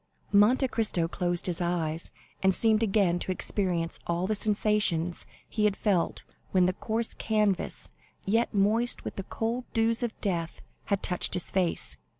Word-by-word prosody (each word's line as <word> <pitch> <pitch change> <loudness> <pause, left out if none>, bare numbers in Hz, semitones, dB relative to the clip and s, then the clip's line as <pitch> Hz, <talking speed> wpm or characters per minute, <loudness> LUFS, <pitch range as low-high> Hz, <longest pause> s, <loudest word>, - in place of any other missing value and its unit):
Monte 230 +6 +5
Cristo 210 -9 0
closed 175 0 -1
his 180 -1 -1
eyes, 170 -2 -1 0.3
and 190 -1 +3
seemed 220 -1 +3
again 195 -5 +2
to 185 - -3
experience 180 -3 -1
all 170 +1 0
the 215 - 0
sensations 205 -5 0 0.2
he 215 -2 0
had 205 -1 +1
felt 190 -6 0 0.3
when 185 -2 +3
the 185 - +1
coarse 225 +4 -2
canvas, 210 -3 -1 0.3
yet 225 +4 +1
moist 215 +4 +3
with - - -5
the - - -3
cold 230 +5 -3
dews 225 +1 +2
of 235 -2 -3
death, 170 -5 -3 0.2
had 200 -1 -1
touched 180 - +1
his 180 - -2
face. 170 - 0
195 Hz, 155 wpm, -28 LUFS, 175-220 Hz, 0.3 s, Monte